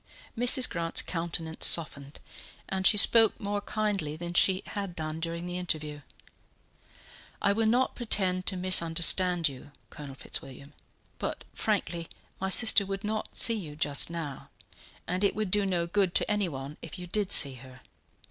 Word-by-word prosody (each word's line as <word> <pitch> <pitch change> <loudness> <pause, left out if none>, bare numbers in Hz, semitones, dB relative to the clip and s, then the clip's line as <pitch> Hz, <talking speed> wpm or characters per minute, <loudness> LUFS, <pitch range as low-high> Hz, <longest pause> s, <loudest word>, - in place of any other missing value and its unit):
Mrs. 250 +2 +5
Grant's 170 -1 -1
countenance 165 -1 0
softened, 145 -3 0 0.5
and 190 0 0
she 210 - +4
spoke 225 +1 +4
more 205 -1 -4
kindly 200 -9 -3
than 175 +1 -6
she 190 +2 +3
had 200 -4 -6
done 155 0 -5
during 170 +1 -5
the 180 0 -4
interview. 155 -4 -3 1.4
"I 200 - +1
will 225 +1 0
not 250 +4 +1
pretend 185 -6 0
to 190 - -1
misunderstand 175 -1 +3
you, 140 +1 -10 0.2
Colonel 140 -3 -10
Fitzwilliam; 140 +1 -7 0.5
but, - - -5
frankly, 175 -6 -3 0.3
my 190 - -3
sister 220 +1 +5
would 195 0 -6
not 215 +1 -5
see 230 - +6
you 170 -9 -7
just 145 -1 +2
now, 160 -5 -7 0.6
and 180 +3 -3
it 200 - +1
would 215 -3 -4
do 205 0 +1
no 175 -3 -1
good 185 0 -1
to - - 0
anyone 150 -9 -4
if 165 +3 -9
you 180 - -8
did 200 +2 -3
see 140 -3 +5
her. 130 -1 -15
180 Hz, 155 wpm, -27 LUFS, 160-205 Hz, 1.4 s, see